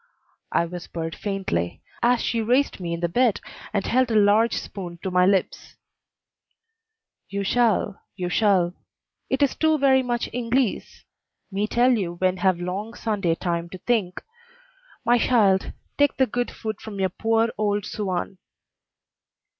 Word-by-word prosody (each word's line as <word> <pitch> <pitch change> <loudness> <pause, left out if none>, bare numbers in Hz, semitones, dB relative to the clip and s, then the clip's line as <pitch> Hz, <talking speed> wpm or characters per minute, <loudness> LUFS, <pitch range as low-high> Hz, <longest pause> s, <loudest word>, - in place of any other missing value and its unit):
I 170 - +2
whispered 170 -1 -6
faintly, 195 - -3 0.2
as 240 0 +3
she 230 - 0
raised 250 +4 +1
me 175 -2 -4
in 170 0 -3
the 170 - +1
bed 240 +5 +2 0.3
and 200 -2 -1
held 255 0 +2
a 225 - 0
large 210 +2 +4
spoon 175 -3 -6
to 190 - -2
my 180 0 +4
lips. 195 -1 0 1.5
"You 200 0 -2
shall 215 -2 +1
you 180 -2 -3
shall; 180 -2 +2 0.6
it 265 +2 +2
is 280 - +2
too 315 -1 +2
very 270 -2 +4
much 240 -1 -2
Inglese; 245 -1 -1 0.5
me 200 +2 -1
tell 245 +3 +3
you 190 -8 0
when 185 +1 +1
have 185 -1 +2
long 195 +6 -4
Sunday 200 -7 0
time 170 -1 -2
to 185 - -8
think. 190 -3 -1 0.8
My 240 +1 +4
shild, 205 -6 +3 0.3
take 285 0 +3
the 265 - +4
good 245 +1 -2
food 220 -2 -6
from 215 -2 -8 0.2
poor 225 +1 +2
old 205 -1 0
Suan." 190 -2 -3
205 Hz, 145 wpm, -24 LUFS, 180-240 Hz, 1.5 s, large